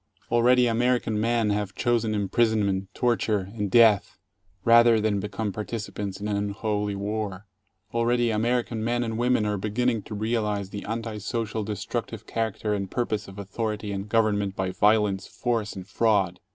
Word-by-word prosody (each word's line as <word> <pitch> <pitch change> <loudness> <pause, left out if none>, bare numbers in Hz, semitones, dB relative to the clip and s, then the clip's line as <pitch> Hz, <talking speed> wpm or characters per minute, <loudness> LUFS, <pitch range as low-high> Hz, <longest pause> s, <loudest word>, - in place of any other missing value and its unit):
Already 125 +1 +5
American 120 -2 +1
men 115 -2 +1
have 100 -1 -2
chosen 115 -3 +1
imprisonment, 100 -2 +1
torture, 110 -5 0
and 105 -3 -2
death, 110 -2 +4 0.5
rather 115 -1 +6
than 105 -1 +1
become 105 +1 -3
participants 105 -1 -5
in 105 - -4
an 105 - 0
unholy 105 0 -1
war. 100 -1 -3 0.5
Already 120 0 +2
American 115 +1 0
men 120 +1 0
and 115 -1 -3
women 120 -3 +2
are 105 0 0
begin 110 +5 0
ning 115 -3 -1
to 105 - -8
realize 105 -2 -1
the 100 - -6
anti 115 -1 -4
social 110 0 -3
destructive 105 +2 -4
character 110 -2 -2
and 100 -2 -2
purpose 110 -3 -2
of 95 0 -11
authority 105 +1 -3
and 100 +1 -4
government 105 -3 +1
by 95 -1 -1
violence, 105 -1 +2
force, 115 -4 -2
and 95 -1 -8
fraud. 100 -4 +1
110 Hz, 155 wpm, -26 LUFS, 100-115 Hz, 0.5 s, rather